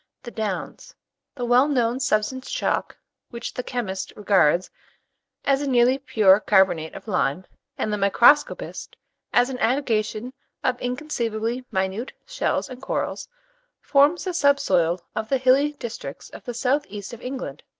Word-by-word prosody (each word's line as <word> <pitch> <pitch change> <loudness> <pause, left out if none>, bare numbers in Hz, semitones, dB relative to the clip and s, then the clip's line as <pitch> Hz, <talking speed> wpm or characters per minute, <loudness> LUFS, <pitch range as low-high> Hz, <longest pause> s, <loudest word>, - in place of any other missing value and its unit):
THE 240 - -8
DOWNS. 215 -5 -5 0.4
The 245 -3 -3
well 245 +3 +4
known 250 -3 +1
substance 255 +2 -1
chalk, - - -1 0.3
which 235 - -6
the - - -3
chemist 235 -7 -4
regards 185 -5 +2 0.7
as 275 0 +2
a 285 - -2
nearly 250 +1 +4
pure 210 -7 +4
carbonate 190 -6 +2
of - - -10
lime, 180 -3 0 0.3
and 215 - -1
the - - 0
microscopist 235 +9 +3 0.4
as 250 +2 +3
an 250 - -5
aggregation 230 -2 0 0.3
of 250 -1 0
inconceivably 245 -3 -2
minute 190 +6 -2
shells - - -1
and 255 -1 -10
corals, - - -3 0.5
forms 290 +4 +3
the 370 - -3
sub 285 -4 +3
soil 175 -8 +1 0.2
of 220 0 -3
the 270 - +3
hilly 265 +3 +3
districts 235 -5 -8
of - - -12
the 245 -2 -5
south 270 +4 0
east 205 +2 -7
of 235 - -9
England. 260 +1 -6
240 Hz, 150 wpm, -24 LUFS, 210-265 Hz, 0.7 s, well